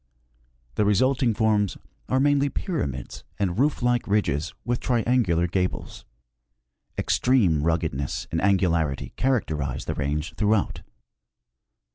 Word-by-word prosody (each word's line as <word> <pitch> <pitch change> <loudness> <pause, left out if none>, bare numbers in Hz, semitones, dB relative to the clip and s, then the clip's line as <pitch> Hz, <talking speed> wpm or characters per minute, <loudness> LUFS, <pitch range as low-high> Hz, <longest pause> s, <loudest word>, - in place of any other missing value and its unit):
The - - +3
resulting 120 +3 +2
forms 105 -4 +1 0.3
are 130 - +2
mainly 145 0 +3
jDyramids 70 - -4 0.2
and 95 0 -1
roof 140 -2 +1
like 120 -1 +1
ridges 95 -6 0
with 120 +1 0
triangular 115 -8 +1
gables. 90 +1 -3 0.9
Extreme 105 - +2
ruggedness 80 -4 -1
and 80 - 0
angularity 85 -7 +1
characterize 75 - -1
the - - -2
range 75 +2 -2
throughout. 105 -1 0
100 Hz, 105 wpm, -25 LUFS, 80-125 Hz, 0.9 s, The